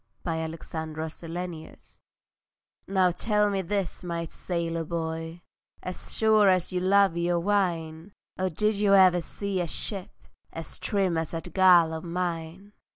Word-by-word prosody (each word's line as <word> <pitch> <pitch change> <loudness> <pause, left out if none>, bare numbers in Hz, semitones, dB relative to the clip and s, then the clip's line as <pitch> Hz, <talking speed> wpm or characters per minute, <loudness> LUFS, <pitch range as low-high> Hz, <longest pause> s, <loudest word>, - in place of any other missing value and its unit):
THE 170 - -2
LOVER 160 0 -3
TO 160 -1 -6
THE 160 +1 -3
SAILOR 170 0 -6 1.1
Now 190 -2 +3
tell 210 +2 +1
me 195 -1 0
this, 190 -1 -3
my 170 -1 -3
sailor 165 -1 -3
boy, 165 +1 -4 0.4
As 185 - -6
sure 215 -2 +5
as 185 0 +1
you 180 - +1
love 195 -1 +4
your 170 0 +1
wine, 170 -3 -1 0.2
Oh 185 0 -1
did 210 +5 0
you 200 -1 +4
ever 185 -2 +6
see 195 +2 -3
a 175 - -2
ship 190 +3 -4 0.3
As 165 0 -8
trim 190 -5 0
as 160 - -3
that 165 -1 -6
girl 175 -4 +6
of 160 - -5
mine? 175 +2 -4
175 Hz, 155 wpm, -27 LUFS, 165-195 Hz, 1.1 s, ever